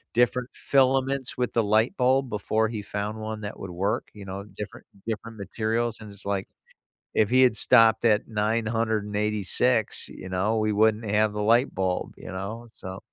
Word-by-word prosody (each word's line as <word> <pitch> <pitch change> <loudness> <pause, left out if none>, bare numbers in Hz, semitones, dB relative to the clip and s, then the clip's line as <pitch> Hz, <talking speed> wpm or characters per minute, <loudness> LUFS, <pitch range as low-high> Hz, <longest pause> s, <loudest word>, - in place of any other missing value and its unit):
different 120 +1 +2
filaments 135 -1 +1
with 125 -1 -1
the 115 - +2
light 110 +3 +2
bulb 130 +1 +2
before 110 +1 0
he 110 -1 -4
found 105 +2 -4
1 110 0 -5
that 105 0 -6
would 95 - -6
work, 100 +6 -1
you 105 -2 -10
know, 95 +1 -6
different 105 -1 -8 0.2
different 115 0 -4
materials; 110 +3 -2
and 105 -2 -9
it's 100 0 -13
like, 100 -1 -1 0.7
if 105 -2 +3
he 130 +1 +5
had 125 -4 +4
stopped 115 0 +5
at 105 -2 +3
986, 110 0 0
you - - -9
know, 95 +5 0
we 110 -1 +1
wouldn't 110 0 +2
have 105 +1 +3
the 105 - -3
light 115 +5 +3
bulb, 95 -1 -1
you - - -9
know, 105 +6 -6
so 95 +1 -8
110 Hz, 175 wpm, -26 LUFS, 105-115 Hz, 0.7 s, he